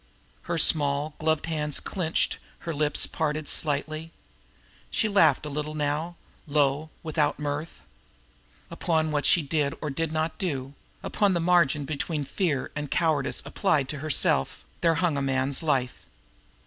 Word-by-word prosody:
Her 170 - 0
small, 145 -1 +4
gloved 160 -1 +1
hands 150 -2 -1
clenched, 170 -4 -1 0.2
her 165 - -4
lips 150 0 +3
parted 155 -1 -2
slightly. 155 +2 -2 0.8
She 220 - +1
laughed 160 -9 +4
a - - -4
little 150 +1 -4
now, 155 +3 -2 0.3
low, 145 +1 +1
without 155 -2 0
mirth. 150 +2 -4 0.9
Upon 160 -2 0
what 145 -1 +1
she 170 - +5
did 145 -1 0
or 150 - -3
did 160 +3 -2
not 160 0 -2
do, 140 -8 -3 0.3
upon 200 -3 +1
the - - +1
margin 165 -4 +3
between 150 0 -3
fear 150 -6 -1
and 150 -1 -4
cowardice 155 -4 0
as - - -19
applied 150 -9 +1
to 150 - -3
herself, 140 - +1 0.2
there 165 -1 +3
hung 165 -3 +1
a - - 0
man's 135 0 +1
life. 135 -6 -1
150 Hz, 150 wpm, -26 LUFS, 145-165 Hz, 0.9 s, she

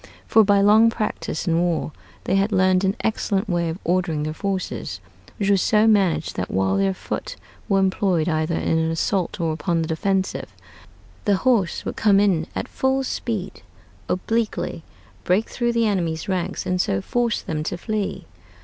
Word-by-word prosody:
For 220 - +5
by 200 -1 +4
long 215 +3 +6
practice 215 -7 -3
in 165 0 +2
war 175 -2 0 0.3
they - - 0
had 195 +2 +2
learned 185 -1 +3
an 195 +1 +1
excellent 215 -1 -1
way 170 -3 0
of 160 - -4
ordering 175 -3 0
their 155 0 -3
forces; 195 +2 -3 0.4
which 205 -2 +1
was 195 -2 +3
so 215 0 +3
managed 200 -6 +2
that - - -2
while 95 0 +1
their 95 -1 +1
foot - - -5 0.3
were 195 - +3
employed 190 -3 +1
either 160 0 0
in 160 - +1
an 160 0 0
assault 185 +4 -1
or 165 -2 0
upon 165 +2 -1
the - - -4
defensive, 190 +4 -1 0.7
the 205 - +4
horse 215 -6 +1
would - - -4
come 200 -2 +4
in 185 -6 +2
at - - -3
full 265 0 0
speed 215 -7 -4 0.5
obliquely, 220 -1 -1 0.4
break 190 +5 +2
through 240 -1 -1
the 230 -1 +2
enemy's 170 -6 -1
ranks, 185 -1 -2
and 180 0 +1
so 95 - 0
force 235 - -1
them 155 -4 -3
to 165 +3 -3
flee. 210 +1 -3
190 Hz, 175 wpm, -22 LUFS, 165-210 Hz, 0.7 s, long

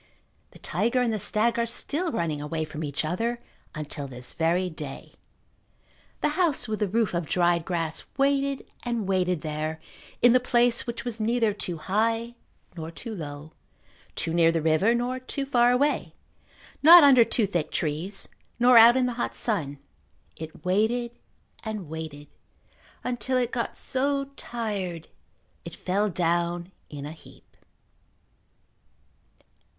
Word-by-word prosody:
The - - -16
tiger 230 +9 0
and 230 -2 0
the 215 - -2
stag 230 +4 +1
are 235 - +2
still 315 +8 -2
running 155 - -2
away 155 +2 -3
from 155 0 -6
each 145 +1 -2
other 230 +9 -1 0.4
until 150 -2 -5
this 125 -1 -4
very 170 +3 +1
day. 150 -5 -8 1.1
The - - +2
house 335 -9 +1
with 215 -1 -3
the 210 - +1
roof 220 +1 0
of 170 -2 -2
dried 175 -1 +2
grass 165 -3 -2
waited 275 0 +1 0.2
and 235 -5 -2
waited 180 -3 +1
there 155 +1 -3 0.4
in 240 -1 +6
the 255 - +6
place 245 -1 +2
which 235 0 -5
was 235 -2 -4
neither 225 -1 +1
too 180 -4 -3
high 225 +7 0 0.4
nor 160 -1 -6
too 225 +7 -7
low, 150 -4 -8 0.6
too 165 - -1
near 165 -1 +5
the 165 - 0
river 165 +9 +3
nor 245 +2 -1
too 275 +2 -4
far 245 -3 +4
away, 280 +4 +1 0.7
not 335 +2 +10
under 265 -4 +8
too 225 -1 +2
thick 175 -6 -2
trees 165 +6 -3 0.3
nor 240 0 +7
out 235 +3 +8
in 255 - +3
the 250 - -1
hot - - -2
sun. 155 - -1 0.6
It 160 0 -10
waited 220 +6 +1 0.5
and 215 -6 -5
waited 150 -2 -8 0.7
until 250 +1 -1
it 245 -1 0
go 235 - -1
so 275 +1 -1
tired 200 - -4 0.5
it - - -8
fell 200 +3 0
down 175 0 -1 0.2
in 145 -1 -7
a 150 - -6
heap. 160 - -16
205 Hz, 145 wpm, -26 LUFS, 165-240 Hz, 1.1 s, not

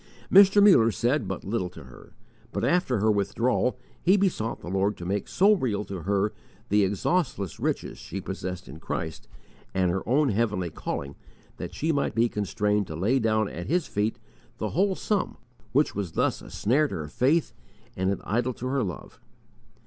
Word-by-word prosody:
Mr. 200 +1 +8
Muller 150 - +7
said 120 - 0
but 95 -1 -4
little 95 -3 -2
to 80 -3 -12
her, 65 -2 -15 0.4
but - - -1
after 175 -9 +2
her 110 +2 +3
withdrawal 115 +5 +1 0.2
he 190 +4 +4
besought 180 - 0
the - - -9
Lord 95 +3 0
to 85 - -7
make 100 +2 -2
so 200 +3 +4
real 110 - -1
to 95 -2 -6
her 100 +4 0 0.4
the 105 0 +4
exhaustless 100 - -1
riches - - -2
she 100 - -6
possessed 90 -1 -5
in 70 +4 -10
Christ, 80 -1 -5 0.5
and 90 -2 +2
her 95 +2 -1
own 140 +2 +3
heavenly 105 -5 0
calling, 70 -2 -4 0.4
that - - -6
she 160 +2 0
might 140 -2 0
be 115 +1 +4
constrained 105 -1 0
to 80 - -6
lay 110 +11 +2
down 110 -2 +2
at 85 -2 -6
His 175 +2 +1
feet 105 +2 -1 0.4
the - - -2
whole 190 +3 +1
sum 205 0 -1 0.3
which 145 +5 +2
was 95 -5 -4
thus - - 0
a - - -11
snare 140 +8 +2
to - - -5
her 75 -2 -4
faith 140 - +1 0.4
and 95 0 0
an 100 - -1
idol 120 +4 0
to 125 - -7
her 135 +1 0
love. 90 -5 -7
105 Hz, 185 wpm, -26 LUFS, 95-135 Hz, 0.5 s, Mr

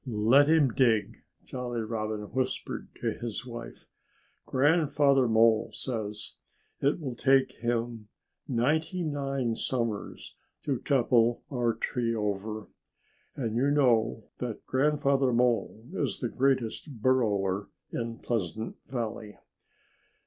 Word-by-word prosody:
"Let 120 +6 +4
him 155 -4 +5
dig!" 115 -4 +2 0.3
Jolly 120 -2 -4
Robin 110 -1 -3
whispered 130 0 -2
to - - +1
his 120 0 -5
wife. 120 -2 -9 0.6
"Grandfather 140 -2 +3
Mole 110 0 +4
says 105 -4 -4 0.4
it 140 +5 +1
will 135 -6 -4
take 135 +2 +3
him 115 -2 -2 0.4
ninety 155 +8 0
nine 135 -6 -1
summers 115 -5 -3 0.3
to 135 -4 -1
topple 120 -3 +2
our 120 -3 +1
tree 115 0 -1
over. 105 0 -3 0.7
And 115 -5 -2
you 135 +4 +2
know 115 -6 +3 0.2
that 120 -3 -5
Grandfather 140 -1 +2
Mole 120 -2 +1
is - - -1
the 120 - -2
greatest 130 +1 0
burrower 105 -6 +1 0.2
in 115 -1 -3
Pleasant 110 -2 -3
Valley." 115 -4 -4
120 Hz, 110 wpm, -29 LUFS, 110-135 Hz, 0.7 s, him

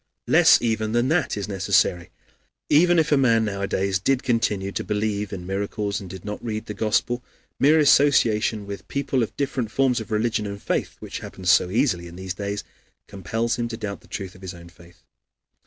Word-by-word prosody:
Less - - +6
even 110 -1 0
than 120 +2 +2
that 160 -8 +1
is 100 - -3
necessary. 95 -3 +1 0.6
Even 175 +4 +5
if 160 -1 +2
a 145 - +5
man 115 -4 +3
nowadays 100 -2 -1
did 130 +6 +1
continue 105 -5 0
to - - -3
believe 105 0 -2
in 90 -3 -6
miracles 100 +2 -3
and 95 - -9
did 95 +1 -9
not 105 0 -6
read 110 -2 -4
the 105 - -6
Gospel, 110 +4 0 0.4
mere 150 +3 +5
association 115 -8 +3
with 100 0 -8
people 140 -2 -1
of 115 - -3
different 130 -5 -2
forms 125 +1 +1
of 110 - -8
religion 110 0 0
and 100 0 -6
faith, - - -2
which - - -6
happens 90 -2 -1
so 90 - +4
easily 95 -5 0
in 85 - -11
these 95 0 -5
days, 100 +1 -4 0.4
compels 115 +5 -2
him 120 -1 -1
to 115 -1 -6
doubt 105 -3 -5
of - - -29
the - - -21
truth 95 -3 -6
of 95 - -17
his 95 -1 -7
own 85 0 -13
faith. 85 0 -19
105 Hz, 200 wpm, -23 LUFS, 95-120 Hz, 0.6 s, Less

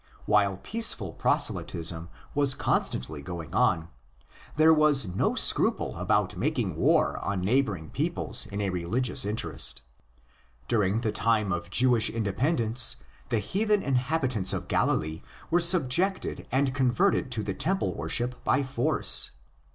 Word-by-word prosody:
While 100 -2 +2
peaceful 125 - +1
proselytism 85 0 -1 0.2
was 140 -2 +3
constantly 70 +4 -2
going 85 +1 -8
on, 80 0 +1 0.7
there 155 +2 +5
was 150 -5 +3
no 90 -1 -1
scruple - - +2
about - - 0
making - - -2
war - - +2
on 100 -2 -3
neighbouring 105 -6 -1
peoples - - -1
in 100 +1 -5
a 100 -2 -1
religious 95 +8 0
interest. 70 - -2 0.8
During 105 0 +1
the 110 - -1
time 110 -3 0
of 85 0 -5
Jewish 120 +2 +3
independence 115 - 0 0.3
the 115 - +1
heathen 205 - 0
inhabi 130 +1 0
tants 100 -6 0
of - - -4
Galilee 80 +1 0 0.3
were 175 - +4
subjugated 175 +2 +1
and 135 0 +1
converted 135 +6 +1
to 110 -3 -3
the 100 - -3
temple 190 - -1
worship 125 +1 -3
by 140 - +1
force. 130 -2 +1
115 Hz, 130 wpm, -27 LUFS, 95-140 Hz, 0.8 s, there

